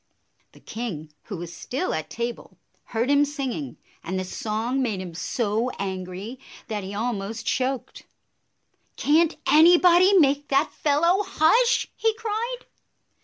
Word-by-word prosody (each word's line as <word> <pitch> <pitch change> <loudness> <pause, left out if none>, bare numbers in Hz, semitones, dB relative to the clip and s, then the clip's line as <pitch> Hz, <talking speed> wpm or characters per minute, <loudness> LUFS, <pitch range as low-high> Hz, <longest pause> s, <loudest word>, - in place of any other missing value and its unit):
The - - -17
king, 170 -10 -6
who 200 - -6
was 170 0 -7
still 280 +9 -3
at 155 0 -4
table, 235 +7 -5 0.3
heard 235 +1 -1
him 285 0 +5
singing, 280 -1 -4 0.3
and 185 +3 -3
the - - -2
song 225 +7 -2
made 220 -7 -1
him 180 -2 -7
so 220 +6 -1
angry 190 +4 -5 0.3
that 210 -2 -3
he 195 +2 -6
almost 220 0 -3
choked. 260 0 -2 0.9
"Can't 320 +3 +2
anybody 350 +4 +6
make 285 -2 +3
that 275 +2 +2
fellow 335 +6 +2
hush?" 460 +7 +3
he 450 -1 +1
cried. 455 +3 -3
255 Hz, 130 wpm, -24 LUFS, 205-320 Hz, 0.9 s, anybody